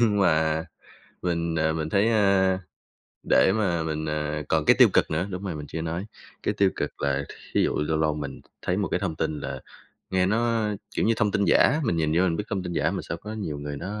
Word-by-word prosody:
Nhưng 105 -3 +3
mà, 80 -2 +2 0.6
mình, 85 -2 -1
ờ, 80 -1 +1
mình 80 -1 -2
thấy, 100 +5 +3
ơ, 95 -3 +3 0.7
để 95 - +5
mà 90 -7 +1
mình, 80 -1 -3
ờ 75 0 -2
còn 80 -1 +2
cái - - +6
tiêu - - +9
cực - - +3
nữa, 80 +4 0
đúng 90 +1 -5
rồi, 95 -4 -3
mình 75 -1 -7
chưa 80 - -4
nói, 85 +4 -3 0.4
cái - - 0
tiêu 100 -1 +3
cực - - -4
là 70 0 0 0.3
thí - - +3
dụ - - 0
lâu 80 +1 0
lâu 75 -1 +1
mình 70 -2 -6 0.2
thấy 90 - -1
một 100 - 0
cái - - -1
thông 90 -6 -2
tin 80 -2 -2
là, 65 -1 -5 0.5
nghe 95 -1 +2
nó, 115 +1 +1 0.3
kiểu, - - +2
như 115 - +3
thông 105 -2 +2
tin 100 0 +1
giả, 150 - +4
mình 100 -8 +1
nhìn 80 -1 +1
vô 90 - +4
mình 85 -3 +1
biết 105 - -3
thông 95 -3 -1
tin 90 - -5
giả - - +1
mà - - -3
sao - - -4
có 105 +1 -8
nhiều 95 -9 -4
người 75 0 -5
nó 100 +8 -5
85 Hz, 245 wpm, -26 LUFS, 80-100 Hz, 0.7 s, tiêu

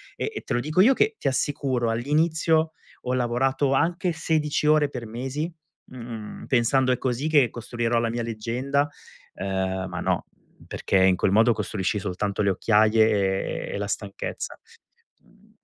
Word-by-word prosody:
e - - -2
e - - -4
te - - -4
lo 120 - +2
dico 155 +8 +2
io 250 +7 +6
che, 435 - +1
ti - - -3
assicuro, 130 -3 0
all'inizio 155 +6 +1 0.3
ho 125 - +1
lavorato 130 +3 +1
anche 175 +5 +1
16 155 -2 0
ore 150 -1 +4
per 125 -4 -6
mesi, 135 +8 -4 0.4
mhmm, 115 -4 -8
pensando: 130 +1 +3
"È 125 - +1
così 130 +3 -1
che 145 -6 +4
costruirò 120 0 -2
la 115 0 0
mia 120 +1 -2
leggenda", 120 +6 -1 0.5
ehm, 95 -1 -2
ma - - -5
no, - - -1 0.4
perché - - 0
in 95 -1 +5
quel 95 - +1
modo 110 +4 +5
costruisci 105 -2 -2
soltanto 100 +1 -2
le 100 - +3
occhiaie, 105 -1 +2
e - - -5
e - - -2
la 100 - -2
stanchezza. 100 -1 -5 0.6
Mhmm - - -26
120 Hz, 160 wpm, -25 LUFS, 110-145 Hz, 0.6 s, io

